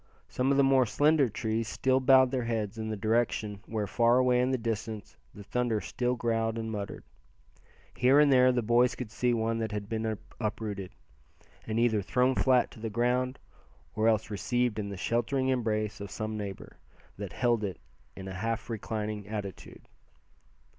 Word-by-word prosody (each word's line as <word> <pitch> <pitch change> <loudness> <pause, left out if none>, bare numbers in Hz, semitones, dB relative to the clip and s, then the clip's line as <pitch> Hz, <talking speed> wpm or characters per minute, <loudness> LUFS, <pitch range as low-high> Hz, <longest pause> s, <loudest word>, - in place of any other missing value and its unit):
Some 130 +1 -1
of 140 - +3
the 140 - +5
more 135 -2 +4
slender 145 +3 +3
trees 110 +1 -2
still 130 +2 +1
bowed 130 -1 +5
their 130 -3 -1
heads 110 -2 -2
in 110 0 -3
the 110 - -3
direction 110 -1 0
where, 110 -2 -2
far 115 +4 +3
away 125 -1 +3
in 125 - +1
the 130 - +1
distance, 110 -2 -4 0.2
the 105 - -9
thunder 120 0 0
still 125 +3 -2
growled 115 -1 -1
and 110 0 -3
muttered. 100 -2 -5 0.9
Here 130 +3 +5
and 145 -2 +5
there 130 0 +6
the 125 -1 0
boys 120 +2 +3
could 120 -4 -6
see 125 +1 +1
one 115 -1 0
that 110 -1 -2
had 105 -1 -4
been 110 -1 -2 0.2
uprooted, 105 -4 -3 0.8
and 110 +1 -1
either 115 -3 +2
thrown 125 +6 +2
flat 130 -1 +3
to - - -13
the 110 0 -4
ground, 125 +3 0 0.6
or 110 +1 +1
else 110 -1 +1
received 120 +3 0
in 100 -1 -3
the 100 - -6
sheltering 120 +6 0
embrace 110 -5 -1
of 100 - -6
some 110 +2 -4
neighbor, 100 -3 -7 0.4
that 100 -4 -6
held 120 0 +1
it 95 -3 -3 0.4
in 95 - -8
a 95 - -6
half 115 +4 -3
reclining 105 -2 -4
attitude. 100 -3 -7
115 Hz, 180 wpm, -29 LUFS, 105-125 Hz, 0.9 s, there